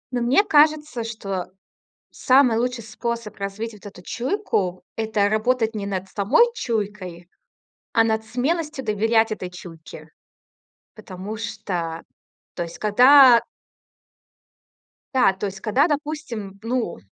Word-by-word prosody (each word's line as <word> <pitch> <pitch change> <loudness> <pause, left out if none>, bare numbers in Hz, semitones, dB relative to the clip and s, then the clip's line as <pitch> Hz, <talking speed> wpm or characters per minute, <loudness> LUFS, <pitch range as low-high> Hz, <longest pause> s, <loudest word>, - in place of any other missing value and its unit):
Но 245 - 0
мне 255 +11 +4
кажется, 300 - +2
что 200 -5 -5 0.6
самый 255 -3 +3
лучший 245 -1 -2
способ 230 0 -5
развить 200 +3 -5
вот 210 0 -16
эту 195 -3 -11
чуйку- 235 - -2
это 220 -2 0
работать 225 +1 0
не 205 -2 -4
над 195 -1 -4
самой 205 - +3
чуйкой, 200 - -4 0.6
а 225 - +5
над 220 -1 -1
смелостью 285 +5 -2
доверять 225 +1 +1
этой 185 -4 -4
чуйке. 175 -3 -12 0.9
Потому 205 0 -8
что, 180 -7 -4 0.5
то 175 - -3
есть 170 0 -10
когда 250 +3 +7 1.7
Да, 255 -7 +4
то 190 +2 -5
есть 195 -1 -6
когда, 250 +9 +2
допустим, 290 - -4
ну, 245 +1 -2
220 Hz, 120 wpm, -22 LUFS, 200-250 Hz, 1.7 s, когда